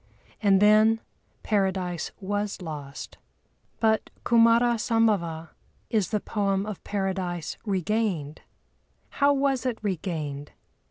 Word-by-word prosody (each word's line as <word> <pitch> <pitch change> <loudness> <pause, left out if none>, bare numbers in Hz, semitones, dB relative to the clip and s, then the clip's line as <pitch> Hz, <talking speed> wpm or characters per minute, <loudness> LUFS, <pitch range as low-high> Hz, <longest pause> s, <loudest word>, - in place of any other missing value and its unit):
And 200 -3 +4
then 215 +2 +5 0.4
Paradise 190 -4 0
was 205 +1 -2
lost. 150 -6 -8 0.6
But 220 -1 +2 0.2
Kumâra 235 0 +4
Sambhava 200 -9 +1 0.4
is 215 -5 +1
the 215 - 0
poem 200 -2 -1
of 210 -3 -7
Paradise 190 -4 -2
Regained. 190 -6 -1 0.7
How 285 0 +3
was 275 -3 +1
it 250 -3 -1
regained? 155 -7 -3
200 Hz, 100 wpm, -26 LUFS, 175-225 Hz, 0.7 s, then